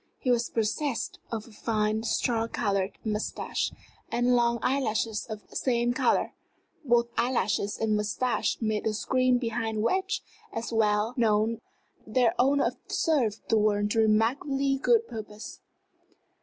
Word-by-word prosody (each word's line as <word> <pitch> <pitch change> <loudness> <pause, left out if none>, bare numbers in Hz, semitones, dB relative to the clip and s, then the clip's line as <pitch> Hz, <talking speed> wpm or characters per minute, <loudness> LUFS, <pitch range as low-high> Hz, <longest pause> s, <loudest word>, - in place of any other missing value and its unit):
He 255 - 0
was 240 -1 +1
possessed 230 +4 -1
of 220 -2 -3
a - - -15
fine, 215 0 0
straw 230 0 0
colored 200 -4 -1
mustache, 215 0 -2 0.4
and 245 +1 +2
long 235 -1 +3
eyelashes 225 -5 0
of 215 -2 -8
the - - -16
same 240 -1 +1
color. - - +1 0.5
Both 240 -3 +3
eyelashes 210 -4 0
and 220 -1 +1
mustache 215 +4 0
made 220 -1 -1
a 215 - 0
screen 255 +2 +2
behind 225 -3 -2
which, 375 +8 0 0.3
as 235 -13 -4
was 225 - 0
well 210 +1 +2
known, 225 0 +2 0.5
their 235 +1 +3
owner 275 +3 +4
observed 250 - 0
the 220 - +4
world 205 0 +1
to 225 - +1
remarkably 270 +6 +2
good 460 - +3
purpose. 215 -1 -8
230 Hz, 140 wpm, -28 LUFS, 215-250 Hz, 0.5 s, owner